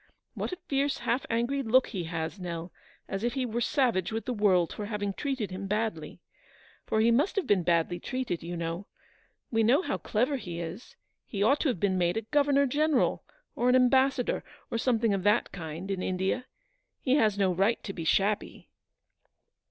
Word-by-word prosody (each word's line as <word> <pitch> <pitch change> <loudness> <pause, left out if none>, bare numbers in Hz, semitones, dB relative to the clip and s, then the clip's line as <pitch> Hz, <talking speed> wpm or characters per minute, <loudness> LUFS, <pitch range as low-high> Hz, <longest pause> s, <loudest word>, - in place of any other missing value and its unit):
What - - -4
a 365 - -4
fierce, 280 0 +1
half 240 +2 -1
angry 240 +5 0
look 255 +1 +3
he 185 -6 -4
has, 165 +3 -4
Xell, 170 -1 -5 0.4
as 195 +2 -4
if 240 +2 0
he 260 -2 0
were 235 0 -2
savage 240 - +1
with 225 +1 -3
the 250 - -1
world 190 -6 +3
for 210 - -5
having 205 -2 -2
treated 260 -5 -3
him 190 +1 -5
badly. 205 -7 -2 0.7
For 220 - +2
he 230 +1 +4
must 285 +11 +2
have 395 - 0
been 200 -3 +3
badly 170 0 +1
treated, 255 -6 -3
you 175 +1 -5
know. 170 +3 -4 0.7
TTe 225 0 +3
know 260 - +4
how - - -2
clever 250 +6 0
he 175 -8 -6
is. 170 +7 -7 0.3
He 200 -2 -1
ought 275 +7 +4
to - - +1
have 245 -10 0
been 190 -1 +1
made 175 +3 +1
a 225 - -1
governor 280 +3 +3
general, 290 0 +1 0.3
or 245 - +2
an 250 - +5
ambassador, 260 0 +3 0.3
or 230 - -1
something 230 -3 +2
of 195 - 0
that 205 +4 +2
kind, 170 +2 -6
in 190 -1 -2
India. 190 +8 -1 0.5
He 255 - +1
has 215 -6 +3
no 190 -2 +2
right 195 +6 +1
to 195 - -5
be 170 - -5
shabby." 200 +5 0
215 Hz, 190 wpm, -29 LUFS, 185-255 Hz, 0.7 s, an